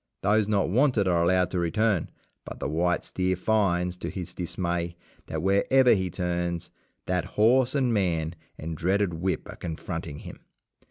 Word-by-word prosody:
Those 105 +1 +3
not 105 -2 +2
wanted 120 -2 +3
are 85 -2 +3
allowed 90 +1 +2
to 90 - -1
return, 100 +2 +1 0.3
but - - -9
the - - -2
white 85 +3 0
steer 95 0 0
finds, 90 -3 +1
to - - -5
his 90 -4 -6
dismay, 85 -1 -2 0.3
that 80 0 -4
wherever 120 +7 +4
he 95 -3 0
turns 85 -1 -2 0.3
that 90 -1 0
horse 125 +5 +4
and 130 -4 +2
man 85 -6 0 0.2
and 80 +1 -5
dreaded 95 +3 +1
whip 90 +3 -2
are - - -9
confronting 80 -2 -5
him. - - -10
90 Hz, 160 wpm, -27 LUFS, 85-105 Hz, 0.3 s, wherever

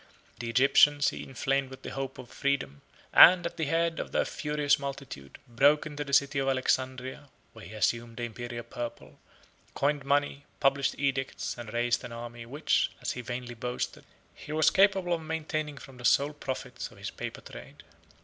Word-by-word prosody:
The 120 -1 -4
Egyptians 140 +4 +5
he - - -7
inflamed 135 +1 -1
with 130 0 -12
the - - -6
hope 135 -1 -5
of 130 -2 -11
freedom, 135 - -1 0.3
and, 175 0 +9
at 170 - -4
the 160 - 0
head 165 +2 0
of - - -5
their - - +1
furious 150 -1 0
multitude, 140 - -7
broke 140 +6 +4
into 150 -1 -4
the 140 - -8
city 140 0 +3
of 135 - -1
Alexandria, 130 +1 -1 0.2
where 110 -3 -12
he 105 - -10
assumed 115 +2 -1
the 120 - -4
Imperial 120 +1 -5
purple, 115 - -7 0.6
coined 145 0 +1
money, 145 0 0 0.2
published 135 0 +2
edicts, 135 -1 -2
and 120 -3 -8
raised 120 +1 0
an 125 - -7
army, 120 0 -8
which, 145 +5 +1
as - - -2
he 125 - -5
vainly 120 0 -5
boasted, 125 +1 -4 0.3
he - - -10
was 155 0 +4
capable 190 -2 +3
of 165 - -1
maintaining 155 -2 -3
from 135 -2 -12
the 125 - -8
sole 145 +4 +4
profits 135 -3 -5
of - - -18
his - - -6
paper - - -6
trade. - - -12
135 Hz, 180 wpm, -29 LUFS, 120-145 Hz, 0.6 s, and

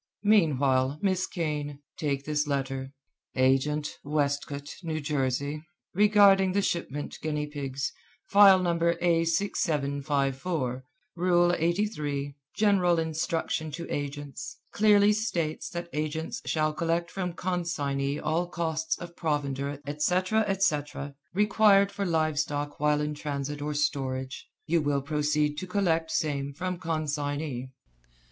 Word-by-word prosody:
Meanwhile, 140 -9 +3
Miss 185 -1 +1
Kane, 150 -5 -3 0.2
take 140 -2 -2
this 150 0 0
letter: 135 -1 -2 0.4
Agent, 135 +3 +1
Westcote, 145 -1 -2
N. 155 -2 -3
J. 140 +1 -1 0.3
Regarding 200 -1 +5
shipment 170 -7 -2
guinea 150 -1 -1
pigs, 140 -2 -4 0.3
File 200 -1 +8
No. 175 -2 0
A6754. 155 -5 0 0.3
Rule 175 0 +3
83, 155 -6 -1 0.2
General 190 -5 +3
Instruction 160 0 -1
to 165 +3 -6
Agents, 145 -2 -5 0.2
clearly 210 -1 +5
states 175 -8 -2
that 170 0 -5
agents 155 +1 -3
shall 155 -1 +1
collect 170 +2 -1
from 180 -3 -3
consignee 145 -6 -1
all 170 +3 0
costs 160 -2 -2
of 170 0 -9
provender, 140 -3 -2
etc., 180 +9 +1
etc., 145 -7 -1 0.2
required 205 -1 +5
for 200 -1 -2
live 155 -3 +1
stock 145 -1 -2
while 150 0 +2
in 150 0 -1
transit 145 0 -4
or 150 0 -2
storage. 130 -3 -2 0.2
You 170 0 +2
will 145 -2 0
proceed 150 0 0
to 185 - -6
collect 170 -4 +1
same 140 -3 -1
from 180 +2 -3
consignee." 145 -5 -2
155 Hz, 115 wpm, -28 LUFS, 145-175 Hz, 0.4 s, File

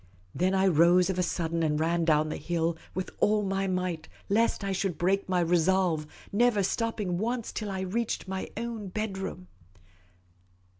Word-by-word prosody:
Then 185 +2 +1
I 190 0 +3
rose 175 +1 +5
of 185 - -3
a - - +4
sudden, 170 -1 -1
and 150 -2 +1
ran 165 +1 +1
down 155 -1 +3
the - - -3
hill 165 +1 -1 0.2
with 185 0 -3
all 210 0 +3
my 195 0 -1
might, 180 -3 -2 0.2
lest 220 +1 +2
I 195 - -1
should 190 -3 -1
break 195 +2 +1
my 180 -1 +2
resolve, 170 -2 +2 0.2
never 215 -1 +3
stopping 205 -3 -1
once 235 +2 -2
till 215 -2 -4
I 190 -1 -3
reached 210 +3 -2
my 190 0 -4
own 230 -3 -4
bedroom. 190 -2 -4
185 Hz, 165 wpm, -28 LUFS, 170-200 Hz, 0.2 s, rose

